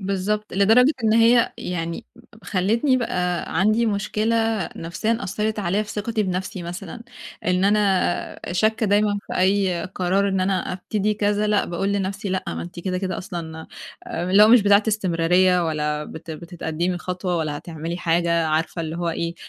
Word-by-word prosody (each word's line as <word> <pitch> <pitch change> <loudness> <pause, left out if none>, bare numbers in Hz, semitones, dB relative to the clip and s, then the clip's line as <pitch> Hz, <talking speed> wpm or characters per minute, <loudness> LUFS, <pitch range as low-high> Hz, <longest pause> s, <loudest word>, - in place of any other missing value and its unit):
بالضبط، 200 +2 -2
لدرجة 225 +9 +5
إن 215 - +3
هي 230 +1 +4
يعني 170 -2 -4 0.4
خلّتني 225 +8 +1
بقى 180 -8 -1
عندي 215 +4 +3
مشكلة 215 -1 0
نفسيًا 215 +8 -2
أثّرت 210 +3 -2
عليَّ 200 +2 0
في - - -10
ثقتي 215 +1 -1
بنفسي 185 -1 -3
مثلًا، 175 +5 -7 0.4
إن 180 +1 +2
أنا 200 -4 0
شاكّة 220 +3 +1
دايمًا 205 0 +2
في - - -4
أي 190 -2 +2
قرار 190 +1 0
إن 190 -1 0
أنا 185 -1 0
أبتدي 210 +3 -1
كذا 210 0 0
لأ، 210 -1 +2
باقول 195 +4 -2
لنفسي 200 0 -2
لأ 185 0 -2
ما 85 0 -4
أنتِ 85 - -8
كده، 185 0 -2
كده 185 -2 -3
أصلًا 165 -4 -7 0.4
آآ، 175 +2 -3
اللي 200 +2 +7
هو 215 - +7
مش 240 -1 +7
بتاعة 200 +1 +5
استمرارية 180 -2 +2
ولا 150 -1 -1
بت 160 +1 -9
بتتقدِّمي 170 +1 -3
خطوة 180 0 -3
ولا 155 -2 -2
هتعملي 165 0 -6
حاجة 170 -1 +1
عارفة 160 +2 -1
اللي 160 +1 -4
هو 175 -1 -2
إيه 170 +1 -3
190 Hz, 165 wpm, -22 LUFS, 170-210 Hz, 0.4 s, اللي